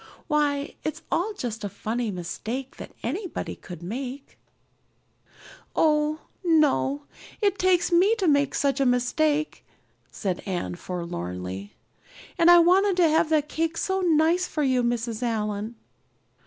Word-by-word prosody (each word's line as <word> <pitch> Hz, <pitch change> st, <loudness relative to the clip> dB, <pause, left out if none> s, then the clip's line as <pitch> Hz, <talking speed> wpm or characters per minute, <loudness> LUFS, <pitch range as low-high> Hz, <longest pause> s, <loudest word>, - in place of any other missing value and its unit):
"Why, 290 Hz, -1 st, 0 dB
it's 315 Hz, +1 st, -4 dB
all 380 Hz, +6 st, +1 dB
just 225 Hz, -3 st, -4 dB
a 205 Hz, -, -2 dB
funny 225 Hz, +4 st, -3 dB
mistake 220 Hz, +8 st, -5 dB
that -, -, -10 dB
anybody 350 Hz, -, -4 dB
might 175 Hz, -2 st, -8 dB
make." 260 Hz, +7 st, -6 dB, 1.4 s
"Oh, 300 Hz, 0 st, +2 dB, 0.2 s
no, 300 Hz, -4 st, +2 dB, 0.4 s
it 400 Hz, -2 st, +1 dB
takes 365 Hz, -2 st, +3 dB
me 375 Hz, +6 st, +5 dB
to 390 Hz, -5 st, 0 dB
make 285 Hz, -2 st, +3 dB
such 275 Hz, -1 st, +1 dB
a 275 Hz, -, +3 dB
mistake," 295 Hz, +5 st, +1 dB, 0.5 s
said 185 Hz, -4 st, -3 dB
Anne 180 Hz, -3 st, -2 dB
forlornly. 95 Hz, -, -5 dB, 0.6 s
"And 335 Hz, 0 st, +6 dB
I 350 Hz, -, +9 dB
wanted 370 Hz, +3 st, +4 dB
to 340 Hz, -3 st, +5 dB
have 315 Hz, 0 st, +3 dB
that 305 Hz, -2 st, +2 dB
cake 325 Hz, +2 st, -2 dB
so 380 Hz, 0 st, 0 dB
nice 340 Hz, +1 st, +3 dB
for 305 Hz, -, -2 dB
you, 260 Hz, -2 st, +2 dB
Mrs. 235 Hz, -1 st, -1 dB
Allan." 215 Hz, -1 st, -2 dB
285 Hz, 135 wpm, -25 LUFS, 225-330 Hz, 1.4 s, I